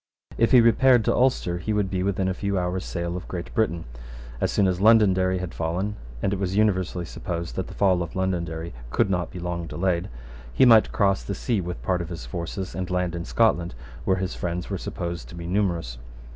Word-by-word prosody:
If 115 - +3
he 125 -3 +8
repaired 115 0 +5
to - - +3
Ulster, 120 -9 +1
he 110 +4 -2
would 100 -2 0
be 95 -1 -1
within 95 0 0
a 95 - 0
few 100 +1 -2
hours' 90 +1 -1
sail 85 -1 -3
of 90 - -6
Great 85 -1 -6
Britain. 85 -7 0 0.6
As - - 0
soon 100 - +3
as 90 -1 0
Londonderry 95 -4 +5
had 90 -1 -5
fallen, 90 +6 -2 0.3
and 100 - +1
it 95 - -2
was 95 -1 -1
universally 95 -4 +1
supposed 85 -4 -5
that - - -3
the - - -10
fall 95 -3 +3
of 85 -1 -5
Londonderry 85 -3 -2 0.2
could 95 - +1
not 90 -2 -1
be - - -9
long 85 -1 -3
delayed, 85 0 -1 0.4
he 130 - +4
might 115 -3 +6
cross 100 -1 +2
the 100 - -4
sea 115 -6 -1
with 90 0 -6
part 90 -2 0
of 85 - -6
his 80 -8 -6
forces, 85 +8 -5
and 90 -1 -4
land 90 -2 0
in 85 0 -4
Scotland, 85 - +2 0.3
where 95 - +2
his 95 0 -2
friends 90 +2 -4
were 95 - -1
supposed 85 -9 -5
to - - -10
be 85 -1 -7
numerous. 85 -10 -1
90 Hz, 215 wpm, -25 LUFS, 85-100 Hz, 0.6 s, he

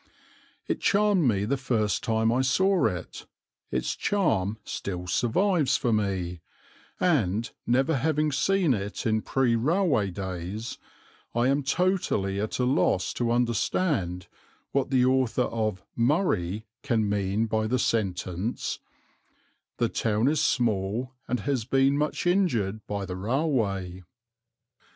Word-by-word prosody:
It - - -2
charmed 205 -6 +3
me 100 -3 +1
the 140 +6 0
first 115 -7 0
time 110 0 +1
I 130 - +2
saw 185 +8 +3
it, 90 -2 -6 0.4
its - - -1
charm 110 - 0
still 90 -4 -5
survives 150 - +2
for 120 -4 0
me, 95 -5 -1 0.6
and, 115 - +1 0.2
never 135 +5 +2
having 150 +2 +1
seen 185 +1 +2
it 100 -1 -4
in 110 -1 +2
pre 125 -1 +1
railway 145 - +2
days, 95 +3 -5 0.6
I 120 +2 +3
am 140 +1 +2
totally 140 - 0
at 110 - -3
a 125 - +1
loss 125 -8 +1
to 120 -1 -1
understand 115 - 0 0.5
what 140 -1 0
the 130 -2 +3
author 130 -1 +2
of 110 -6 -2
"Murray" 115 - +1 0.2
can 115 -6 +1
mean 100 +2 0
by 110 0 0
the 125 +3 +1
sentence 95 -2 -1 1.0
"The 120 - +2
town 110 +2 0
is 150 +1 +2
small, 115 +1 0
and 125 -2 -1
has 135 -3 -1
been 135 +3 +2
much 150 +4 -1
injured 120 - +1
by 100 -1 -3
the 90 -1 -5
railway." 100 - -1
115 Hz, 130 wpm, -27 LUFS, 100-140 Hz, 1.0 s, charmed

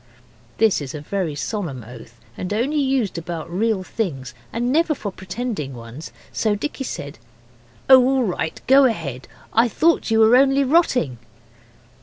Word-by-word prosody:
This 220 -7 +3
is 140 +1 -6
a 150 - -6
very 170 -1 -3
solemn 145 - -4
oath, 115 0 -13 0.2
and 180 - -5
only 260 +8 0
used 265 -10 0
about 165 -1 -6
real 205 +1 0
things, 135 - -4 0.2
and 240 +2 -1
never 320 +1 +2
for 205 -6 -5
pretending 190 - -5
ones, 120 +6 -9 0.2
so 215 -2 +1
Dicky 270 +5 -4
said 145 - -6 0.7
'Oh, 260 -1 +8
all 265 0 +2
right; 180 -6 -3
go 270 +1 +6
ahead! 160 - -2 0.3
I 230 +2 +4
thought 325 +7 +2
you 225 - +2
were 220 +2 +6
only 270 +1 +4
rotting. 255 - +2
205 Hz, 155 wpm, -21 LUFS, 150-255 Hz, 0.7 s, Oh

